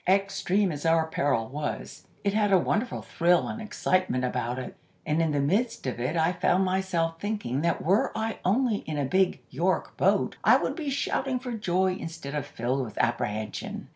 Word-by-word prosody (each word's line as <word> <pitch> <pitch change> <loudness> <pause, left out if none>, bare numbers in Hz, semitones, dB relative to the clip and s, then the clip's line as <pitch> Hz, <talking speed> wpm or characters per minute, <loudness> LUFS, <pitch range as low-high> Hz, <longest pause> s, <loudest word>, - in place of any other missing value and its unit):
"Extreme 195 0 +2
as 145 -2 -5
our 165 0 +3
peril 140 -7 0
was, 145 +3 -5 0.2
it 200 -1 +1
had 210 -1 +2
a 190 - +7
wonderful 215 +7 -1
thrill 175 +1 +2
and 225 - -5
excitement 185 - 0
about 125 -1 -2
it, 130 - -6 0.3
and 155 +2 +1
in 165 - +2
the 145 - +1
midst 215 - 0
of 125 -2 -3
it 125 +7 -1
I 165 +1 +3
found 180 +1 +2
myself 180 -3 0
thinking 205 - -2
that 170 +1 0
were 195 +6 +3
I 220 0 -2
only 220 +3 +2
in 155 -1 -3
a 145 - 0
big 185 +6 +2
York - - 0
boat - - +2
I - - +7
would - - -2
be 310 -5 -3
shouting 270 -1 -1
for 250 0 -6
joy 185 -4 +1
instead 165 -5 -6
of 150 -2 -3
filled 130 +3 -1
with 110 -4 -8
apprehension. 110 -2 -2
175 Hz, 190 wpm, -27 LUFS, 145-200 Hz, 0.3 s, a